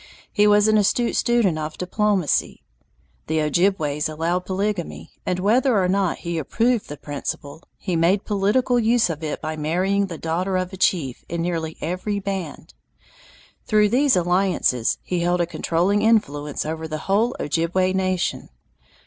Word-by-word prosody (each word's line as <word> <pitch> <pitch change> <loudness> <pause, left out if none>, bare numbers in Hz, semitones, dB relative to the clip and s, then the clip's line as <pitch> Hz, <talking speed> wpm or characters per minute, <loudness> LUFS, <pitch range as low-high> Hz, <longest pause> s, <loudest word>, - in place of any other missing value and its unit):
He 210 -1 +3
was 210 0 +5
an 215 0 +4
astute 235 +4 +1
student 230 -9 +2
of 155 0 -5
diplomacy. 185 - 0 0.6
The 160 0 0
Ojibways 155 -2 +1
allowed 170 +4 -2
polygamy, 195 -2 -3 0.2
and 180 - 0
whether 230 +6 +2
or 185 - +2
not 190 -1 +1
he 170 -1 -2
approved 230 - 0
the 145 - -6
principle, 145 +1 -6 0.2
he 180 -3 -3
made 175 +5 +2
political 215 +5 +1
use 225 -4 +2
of 160 0 -7
it 150 - -3
by 155 0 -3
marrying 185 +6 0
the 170 -3 -7
daughter 180 +4 -1
of 185 +1 -3
a - - -4
chief 160 -9 0
in 170 0 -2
nearly 165 -2 -3
every 185 +5 -2
band. 190 -6 -5 0.9
Through 210 -1 +4
these 265 +3 +3
alliances 175 -9 +1
he 180 - -2
held 175 +1 +1
a 175 - +2
controlling 175 +4 0
influence 150 -11 +1
over 160 +1 -4
the 155 0 -6
whole 220 +6 +1
Ojibway 175 +4 0
nation. 185 -1 -1
180 Hz, 155 wpm, -22 LUFS, 160-205 Hz, 0.9 s, was